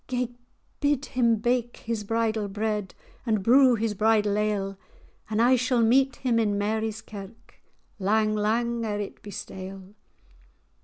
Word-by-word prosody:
"Gae 250 Hz, -1 st, -1 dB, 0.5 s
bid 290 Hz, -1 st, +1 dB
him 235 Hz, -2 st, +2 dB
bake 240 Hz, +2 st, -1 dB
his 225 Hz, -2 st, -4 dB
bridal 220 Hz, 0 st, 0 dB
bread, 210 Hz, -1 st, -3 dB, 0.3 s
And 215 Hz, -5 st, 0 dB
brew 255 Hz, +2 st, +6 dB
his 225 Hz, -1 st, -1 dB
bridal 210 Hz, 0 st, +2 dB
ale; 200 Hz, -2 st, -1 dB, 0.5 s
And 215 Hz, 0 st, -1 dB
I 245 Hz, +3 st, +5 dB
shall 250 Hz, -1 st, +2 dB
meet 265 Hz, +4 st, +3 dB
him 240 Hz, -3 st, 0 dB
in 205 Hz, -2 st, +1 dB
Mary's 220 Hz, +1 st, -2 dB
Kirk, 215 Hz, +3 st, -12 dB, 0.4 s
Lang, 215 Hz, +2 st, +2 dB
lang 230 Hz, +3 st, 0 dB
ere 210 Hz, -2 st, -2 dB
it 205 Hz, -, -6 dB
be 210 Hz, -, -10 dB
stale." 190 Hz, 0 st, -8 dB
220 Hz, 145 wpm, -26 LUFS, 205-235 Hz, 0.5 s, brew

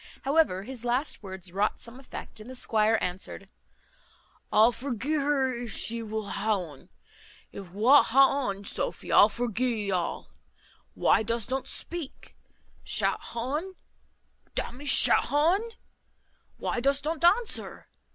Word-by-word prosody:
However, 275 Hz, -, +2 dB
his 245 Hz, +1 st, -8 dB
last 245 Hz, +5 st, -1 dB
words 190 Hz, -3 st, -8 dB
wrought 200 Hz, +3 st, 0 dB
some 240 Hz, +2 st, -9 dB
effect, 260 Hz, -4 st, -9 dB
and 215 Hz, +3 st, -11 dB
the 260 Hz, -, -8 dB
squire 220 Hz, -2 st, +2 dB
answered, 185 Hz, +2 st, -5 dB, 1.0 s
"I'll 220 Hz, +3 st, +6 dB
forgee 260 Hz, +4 st, -2 dB
her 275 Hz, -3 st, +1 dB
if 235 Hz, -3 st, -6 dB
she 230 Hz, 0 st, -1 dB
wull 220 Hz, -2 st, -4 dB
ha 210 Hz, +1 st, 0 dB
un. 155 Hz, -7 st, -10 dB, 0.6 s
If 195 Hz, -3 st, -9 dB
wot 230 Hz, +10 st, +5 dB
ha 275 Hz, +2 st, +4 dB
un, 200 Hz, 0 st, -4 dB
Sophy, -, -, -4 dB
I'll 205 Hz, -, +7 dB
forgee 240 Hz, +2 st, -1 dB
thee 205 Hz, -2 st, -3 dB
all. 180 Hz, -2 st, -2 dB, 0.6 s
Why -, -, +3 dB
dost 230 Hz, +2 st, -2 dB
unt 265 Hz, -, -2 dB
speak? 340 Hz, -5 st, -8 dB, 0.5 s
Shat -, -, 0 dB
ha 235 Hz, -, -7 dB, 0.2 s
un! 375 Hz, +4 st, -6 dB, 0.8 s
d -, -, 0 dB
n 245 Hz, -, -10 dB
me, 290 Hz, -, -10 dB
shat 280 Hz, -, +5 dB
ha 295 Hz, +3 st, +3 dB
un! 425 Hz, +5 st, -1 dB, 0.9 s
Why -, -, -2 dB
dost 275 Hz, +3 st, 0 dB
unt 320 Hz, +1 st, -2 dB
answer? 415 Hz, +7 st, +1 dB
240 Hz, 150 wpm, -28 LUFS, 210-275 Hz, 1.0 s, I'll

